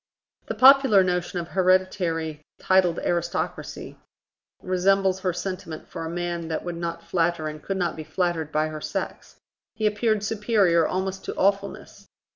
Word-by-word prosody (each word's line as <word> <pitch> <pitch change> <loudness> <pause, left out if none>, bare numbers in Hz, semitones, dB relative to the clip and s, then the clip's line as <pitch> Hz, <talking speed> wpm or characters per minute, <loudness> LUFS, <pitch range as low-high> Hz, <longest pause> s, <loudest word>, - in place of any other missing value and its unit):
The - - -3
popular 265 -7 +7
notion 180 0 -1
of 170 -1 -4
hereditary 180 -4 +1 0.2
titled 185 -3 +2
aristocracy 170 0 -3 0.6
resembles 190 +1 +2
her 185 -1 0
sentiment 185 -2 -6
for - - -6
a 160 - -4
man 175 -1 -3
that 160 -1 -3
would 175 -1 -4
not 170 0 -4
flatter 170 -2 0
and 155 0 -7
could 195 - -3
not 175 -3 -1
be 155 - -6
flattered 165 -2 -2
by 155 0 +1
her 155 -1 -7
sex: - - -5 0.4
he 220 -1 -2
appeared 210 0 +1
superior 210 -6 +2
almost 190 +1 -3
to - - -4
awfulness. 200 +1 -1
180 Hz, 150 wpm, -25 LUFS, 170-195 Hz, 0.6 s, popular